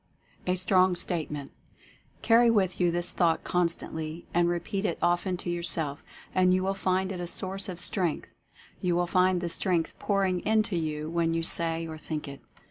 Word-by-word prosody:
A 180 Hz, -, +2 dB
STRONG 185 Hz, 0 st, +3 dB
STATEMENT. 150 Hz, -5 st, -3 dB, 0.7 s
Carry 235 Hz, +1 st, +6 dB
with 195 Hz, -5 st, +1 dB
you 175 Hz, -, +4 dB
this 175 Hz, +1 st, -1 dB
thought 165 Hz, -2 st, +1 dB
constantly 165 Hz, -2 st, -2 dB
and 175 Hz, 0 st, +3 dB
repeat 175 Hz, +4 st, -2 dB
it 175 Hz, -, -1 dB
often 175 Hz, +1 st, +1 dB
to 175 Hz, -, -5 dB
yourself 160 Hz, -4 st, -1 dB, 0.3 s
and 185 Hz, 0 st, +4 dB
you 185 Hz, -, 0 dB
will 195 Hz, +1 st, 0 dB
find 190 Hz, 0 st, 0 dB
it 185 Hz, -, -5 dB
a 175 Hz, -, -4 dB
source 190 Hz, +2 st, -3 dB
of 180 Hz, -2 st, -6 dB
Strength 175 Hz, -3 st, 0 dB, 0.3 s
— -, -, -25 dB
you 175 Hz, -1 st, +1 dB
will 175 Hz, 0 st, +2 dB
find 185 Hz, 0 st, +2 dB
the 175 Hz, -, -2 dB
Strength 170 Hz, -1 st, -1 dB
pouring 195 Hz, -3 st, +1 dB
into 215 Hz, -2 st, +2 dB
you 155 Hz, -2 st, -2 dB
when 165 Hz, 0 st, 0 dB
you 165 Hz, -, 0 dB
say 165 Hz, 0 st, +1 dB
or 160 Hz, -1 st, -7 dB
think 155 Hz, -1 st, -5 dB
it. 140 Hz, 0 st, -9 dB
175 Hz, 185 wpm, -28 LUFS, 165-185 Hz, 0.7 s, Carry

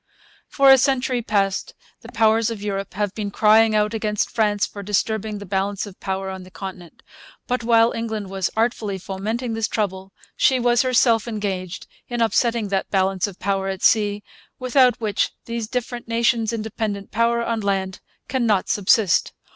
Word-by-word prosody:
For 275 Hz, -1 st, +5 dB
a 265 Hz, -, +7 dB
century 255 Hz, -2 st, +1 dB
past 200 Hz, -, -1 dB, 0.3 s
the -, -, -12 dB
Powers 225 Hz, 0 st, +3 dB
of 225 Hz, -2 st, -5 dB
Europe 195 Hz, -2 st, -4 dB
have 205 Hz, -1 st, -1 dB
been 210 Hz, -2 st, -4 dB
crying 215 Hz, +1 st, +4 dB
out 210 Hz, +1 st, +1 dB
against 210 Hz, -2 st, -1 dB
France 210 Hz, -2 st, +1 dB
for 205 Hz, -, -9 dB
disturbing 210 Hz, +1 st, -1 dB
the 205 Hz, -, -8 dB
balance 195 Hz, +1 st, -2 dB
of 200 Hz, -2 st, -12 dB
power 190 Hz, 0 st, -3 dB
on 190 Hz, 0 st, -7 dB
the 185 Hz, -, -13 dB
Continent. 185 Hz, -2 st, -9 dB, 0.4 s
But 250 Hz, -1 st, -2 dB
while 230 Hz, 0 st, +4 dB
England 220 Hz, -4 st, -4 dB
was 195 Hz, -2 st, -1 dB
artfully 220 Hz, -3 st, 0 dB
fomenting 215 Hz, +6 st, -4 dB
this 225 Hz, -1 st, -1 dB
trouble 190 Hz, -2 st, -3 dB, 0.2 s
she 260 Hz, -1 st, +3 dB
was 240 Hz, 0 st, +3 dB
herself 245 Hz, -3 st, +3 dB
engaged 190 Hz, -5 st, -4 dB, 0.2 s
in 240 Hz, -1 st, -4 dB
upsetting 230 Hz, -1 st, +1 dB
that 195 Hz, -1 st, -1 dB
balance 190 Hz, 0 st, +1 dB
of 195 Hz, -2 st, -10 dB
power 195 Hz, -1 st, -1 dB
at 190 Hz, -1 st, -4 dB
sea 205 Hz, -2 st, +3 dB, 0.3 s
without 255 Hz, -1 st, +3 dB
which 210 Hz, -3 st, -1 dB
these 230 Hz, -1 st, -4 dB
different 245 Hz, 0 st, -4 dB
nations' 230 Hz, -1 st, +1 dB
independent 215 Hz, -2 st, -4 dB
power 235 Hz, +1 st, +1 dB
on 230 Hz, -1 st, -1 dB
land 195 Hz, -2 st, -2 dB, 0.3 s
cannot 230 Hz, -7 st, +1 dB
subsist. 205 Hz, -1 st, +2 dB
215 Hz, 165 wpm, -22 LUFS, 195-230 Hz, 0.4 s, a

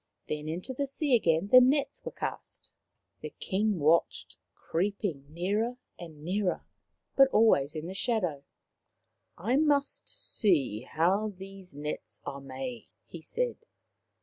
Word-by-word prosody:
Then 150 Hz, 0 st, -3 dB
into 180 Hz, +10 st, -4 dB
the 280 Hz, +2 st, -2 dB
sea 275 Hz, 0 st, -1 dB
again 170 Hz, -3 st, +2 dB
the 255 Hz, +2 st, +9 dB
nets 275 Hz, +3 st, +2 dB
were -, -, -5 dB
cast. -, -, -6 dB, 0.5 s
The -, -, -5 dB
King 210 Hz, +1 st, 0 dB
watched, 160 Hz, +2 st, +2 dB, 0.2 s
creeping 180 Hz, -5 st, -2 dB
nearer 205 Hz, +9 st, -1 dB, 0.2 s
and 160 Hz, -4 st, -10 dB
nearer, 185 Hz, +2 st, -1 dB, 0.5 s
but 270 Hz, -1 st, +7 dB
always 165 Hz, -, +3 dB
in 155 Hz, 0 st, -4 dB
the 185 Hz, -, -5 dB
shadow. 185 Hz, -, -1 dB, 0.5 s
" -, -, -51 dB
I 230 Hz, +9 st, +1 dB
must 290 Hz, -2 st, +1 dB
see 145 Hz, -, 0 dB
how 195 Hz, +7 st, +2 dB
those 190 Hz, -4 st, -11 dB
nets 150 Hz, +1 st, -5 dB
are 140 Hz, -, -5 dB
made," 130 Hz, -3 st, -6 dB, 0.2 s
he 170 Hz, -, -10 dB
said. 485 Hz, -, -2 dB
185 Hz, 135 wpm, -29 LUFS, 155-225 Hz, 0.5 s, the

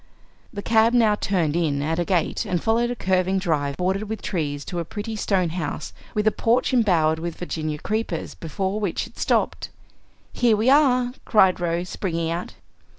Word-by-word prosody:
The 200 Hz, -, -6 dB
cab 225 Hz, +1 st, +4 dB
now 225 Hz, -3 st, +5 dB
turned 175 Hz, -7 st, 0 dB
in 150 Hz, -5 st, 0 dB
at 160 Hz, +3 st, -1 dB
a 175 Hz, -, 0 dB
gate 175 Hz, -4 st, 0 dB
and 180 Hz, -, -1 dB
followed 230 Hz, +5 st, +1 dB
a 245 Hz, -, -2 dB
curving 190 Hz, -2 st, +1 dB
drive 150 Hz, -7 st, -1 dB
bordered 190 Hz, +3 st, -1 dB
with 220 Hz, -2 st, -5 dB
trees 145 Hz, -6 st, -2 dB
to 175 Hz, -, -4 dB
a -, -, -1 dB
pretty 215 Hz, +6 st, -5 dB
stone 190 Hz, -4 st, +1 dB
house 160 Hz, -3 st, -4 dB, 0.2 s
with 210 Hz, 0 st, +1 dB
a 215 Hz, -, +5 dB
porch 240 Hz, +5 st, +1 dB
embowered 170 Hz, -10 st, +3 dB
with 170 Hz, 0 st, -4 dB
Virginia 155 Hz, -3 st, -3 dB
creepers, 215 Hz, -1 st, -3 dB
before 190 Hz, +5 st, -3 dB
which 200 Hz, -5 st, -2 dB
it -, -, -15 dB
stopped. -, -, 0 dB, 0.6 s
"Here 235 Hz, -3 st, +3 dB
we 230 Hz, +5 st, +3 dB
are!" 255 Hz, -4 st, +4 dB
cried 190 Hz, -5 st, +4 dB
Rose, 175 Hz, +1 st, -1 dB
springing 165 Hz, -3 st, -2 dB
out. 170 Hz, +2 st, -4 dB
185 Hz, 180 wpm, -23 LUFS, 165-220 Hz, 0.6 s, now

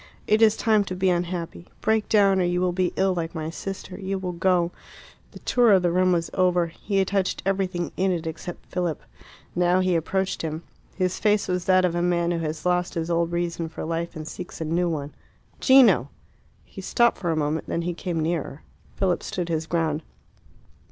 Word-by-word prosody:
"It 215 Hz, +1 st, +3 dB
is 220 Hz, -1 st, +5 dB
time 215 Hz, -2 st, +3 dB
to 185 Hz, -, -4 dB
be 185 Hz, 0 st, +2 dB
unhappy. 175 Hz, -, -3 dB
Break 220 Hz, 0 st, +1 dB
down 195 Hz, -3 st, +4 dB
or -, -, +2 dB
you 175 Hz, 0 st, +1 dB
will 180 Hz, 0 st, +1 dB
be 180 Hz, 0 st, 0 dB
ill 190 Hz, 0 st, +2 dB
like 170 Hz, -1 st, -4 dB
my 160 Hz, 0 st, -3 dB
sister. 190 Hz, +2 st, -7 dB
You 195 Hz, 0 st, -2 dB
will 185 Hz, -1 st, -3 dB
go 175 Hz, 0 st, +1 dB, 0.3 s
" -, -, -24 dB
The -, -, -11 dB
tour 240 Hz, -4 st, +3 dB
of 185 Hz, -2 st, +4 dB
the 175 Hz, -, +2 dB
room 185 Hz, +1 st, +3 dB
was 170 Hz, -2 st, 0 dB
over. 180 Hz, -2 st, +2 dB
He 180 Hz, +4 st, -4 dB
had 195 Hz, -1 st, +2 dB
touched 195 Hz, -2 st, -1 dB
everything 190 Hz, -3 st, -1 dB
in 190 Hz, +1 st, +2 dB
it 170 Hz, -2 st, -2 dB
except 160 Hz, +2 st, -6 dB
Philip. 175 Hz, -4 st, -2 dB, 0.5 s
Now 180 Hz, +1 st, +3 dB
he 185 Hz, -1 st, +2 dB
approached 190 Hz, +4 st, -1 dB
him. 160 Hz, +1 st, -4 dB, 0.3 s
He 185 Hz, -1 st, +1 dB
face 210 Hz, +3 st, +1 dB
was 180 Hz, -1 st, -1 dB
that 185 Hz, -1 st, +4 dB
of 175 Hz, -, 0 dB
a 175 Hz, -, 0 dB
man 175 Hz, -1 st, +1 dB
who 170 Hz, -, -1 dB
has 155 Hz, 0 st, -4 dB
lost 180 Hz, 0 st, +1 dB
his 165 Hz, 0 st, -2 dB
old 170 Hz, 0 st, +1 dB
reason 170 Hz, -1 st, -2 dB
for 160 Hz, -, -6 dB
life 165 Hz, +1 st, -3 dB
and 155 Hz, -1 st, -6 dB
seeks 180 Hz, +3 st, -8 dB
a 160 Hz, -, -3 dB
new 170 Hz, +3 st, +1 dB
one. 150 Hz, -3 st, -4 dB, 0.5 s
"Gino!" 265 Hz, -2 st, +6 dB, 0.6 s
He -, -, -10 dB
stopped 235 Hz, -1 st, +2 dB
for 175 Hz, -, -2 dB
a 165 Hz, -, +1 dB
moment; 155 Hz, +1 st, -1 dB
then 170 Hz, -, -1 dB
he 175 Hz, +1 st, -2 dB
came 170 Hz, -1 st, -3 dB
nearer. 160 Hz, -2 st, -3 dB, 0.3 s
Philip 185 Hz, -2 st, +1 dB
stood 175 Hz, -2 st, -4 dB
his 160 Hz, -1 st, -1 dB
ground. 160 Hz, -3 st, 0 dB
175 Hz, 210 wpm, -25 LUFS, 165-190 Hz, 0.6 s, Gino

